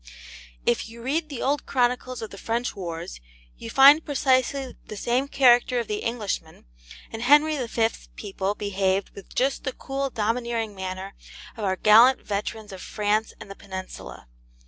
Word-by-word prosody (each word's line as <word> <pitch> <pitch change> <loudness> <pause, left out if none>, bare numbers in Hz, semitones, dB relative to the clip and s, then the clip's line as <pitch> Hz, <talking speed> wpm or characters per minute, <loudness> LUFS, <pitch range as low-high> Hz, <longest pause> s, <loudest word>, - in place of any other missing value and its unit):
If 120 - 0
you 230 +1 -12
read 305 +5 -1
the 275 -5 -5
old 285 +2 0
Chronicles 250 -1 0
of 220 - -7
the 195 - -10
French 235 +2 -2
wars, 170 - -6 0.4
you - - -7
find 285 +4 +7
precisely 265 -1 0
the 215 - -7
same 245 +6 0
character 250 -2 +4
of 235 - -3
the 210 0 -2
Englishman, 210 - -4 0.5
and 225 - -6
Henry 295 +5 +5
V.'s 230 -1 -2
people 200 -1 -3
behaved 195 -1 -1
with 200 - -13
just 270 +2 0
the 260 - -3
cool 275 0 -3
domineering 230 -1 -2
manner 190 0 -6 0.4
of 220 - -7
our 190 -1 +1
gallant 230 +7 +6
veterans 210 +1 -4
of 190 -1 -9
France 210 +1 -1
and 200 - -10
the - - -8
Peninsula. 190 - -9
230 Hz, 160 wpm, -25 LUFS, 200-255 Hz, 0.5 s, find